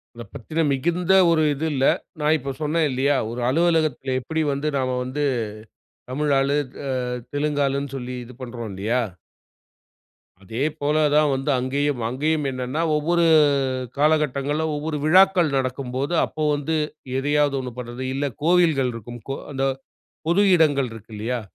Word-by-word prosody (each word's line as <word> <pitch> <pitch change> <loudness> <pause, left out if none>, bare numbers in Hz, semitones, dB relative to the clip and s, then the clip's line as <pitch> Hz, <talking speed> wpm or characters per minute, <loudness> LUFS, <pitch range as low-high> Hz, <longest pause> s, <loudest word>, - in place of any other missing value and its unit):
அத 120 - -7
பத்தின 155 +7 -5
மிகுந்த 170 +7 +1 0.2
ஒரு 160 - +3
இது 145 +3 -3
இல்ல. 135 0 +1 0.3
நான் 150 +1 +3
இப்ப 135 0 -5
சொன்னேன் 155 +1 +1
இல்லையா, 135 +3 +1 0.2
ஒரு 120 - -5
அலுவலகத்தில 155 -4 +1
எப்படி 160 +4 -2
வந்து 140 +2 -2
நாம 130 -1 -1
வந்து 130 +4 -3 0.9
தமிழ் 145 +2 0
ஆளு 140 +2 +1 0.3
அ - - -1 0.4
தெலுங்கு 145 0 0
ஆளுன்னு 140 0 -2
சொல்லி 125 0 -5
இது 125 +1 -13
பண்ணுறோம் 120 -2 -6
இல்லையா? 110 +6 0 1.4
அதேபோல 145 +7 -1 0.2
தான் 150 0 +4
வந்து 135 +2 -3
அங்கேயும். 140 0 -1
அங்கேயும் 150 +4 0
என்னன்னா 130 +4 -3
ஒவ்வொரு 170 +3 +1 0.8
காலகட்டங்கள்ல 150 0 +1
ஒவ்வொரு 150 0 -3
விழாக்கள் 180 -2 +5
நடக்கும்போது, 130 +3 -2
அப்போ 155 - -6
வந்து 145 +2 -1 0.4
எதையாவது 145 0 +1
ஒன்னு 125 -2 -6
பண்றது 125 +1 -6
இல்ல, 140 0 -1
கோவில்கள் 160 -7 +3
இருக்கும் 120 +1 -8
கோ - - 0 0.2
அந்த 135 -1 -1 0.6
பொது 175 +4 +4
இடங்கள் 145 -5 +3
இருக்கு 115 0 -12
இல்லையா? 120 +4 -2
140 Hz, 140 wpm, -23 LUFS, 130-155 Hz, 1.4 s, விழாக்கள்